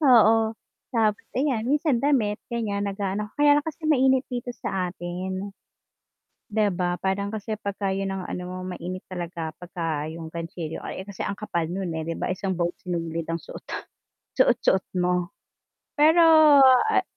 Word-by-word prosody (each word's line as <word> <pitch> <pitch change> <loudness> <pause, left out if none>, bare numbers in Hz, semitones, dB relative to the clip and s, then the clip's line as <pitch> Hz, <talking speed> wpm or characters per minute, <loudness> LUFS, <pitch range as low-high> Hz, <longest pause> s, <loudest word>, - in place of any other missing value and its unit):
Oo, 225 -5 +5 0.3
tapos 215 -3 +1 0.2
ayan 255 -4 0
minsan 290 -4 +2
damit 235 -7 +1
ganiyan 205 -4 -2
nag-aano 200 +1 -2
kaya 290 0 +6
lang 290 - +4
kasi 315 +1 -8
mainit 265 -3 +4
dito 245 0 -4
sa 185 -2 -2
atin. 185 +3 -5 1.0
'Di 215 -1 +2
ba? 175 -1 -1
Parang 200 +2 -1
kasi 220 0 -4
pagka 200 -2 -2
'yun 195 0 -2
ang 190 -1 -4
ano 180 - -4
mo 180 +1 -6 0.2
mainit 180 +2 -6
talaga 170 -3 -5
pagka 165 -4 -3
'yung 165 0 -7
gantsilyo, 165 0 -6
eh, 190 +2 -7
kasi 200 - -5
ang 200 - -4
kapal 170 -5 -2
nun, 180 -3 -3
eh, 160 - -2
'di 165 +1 -4
ba - - -1
isang 185 -1 -2
buong 170 0 0
sinulid 165 -2 -3
ang 165 - -2
suot - - -10 0.7
suot-suot 190 - +3 0.2
mo, 180 +1 0 0.6
Pero, 315 +3 +6 0.7
ah - - +3
195 Hz, 155 wpm, -25 LUFS, 175-225 Hz, 1.0 s, kaya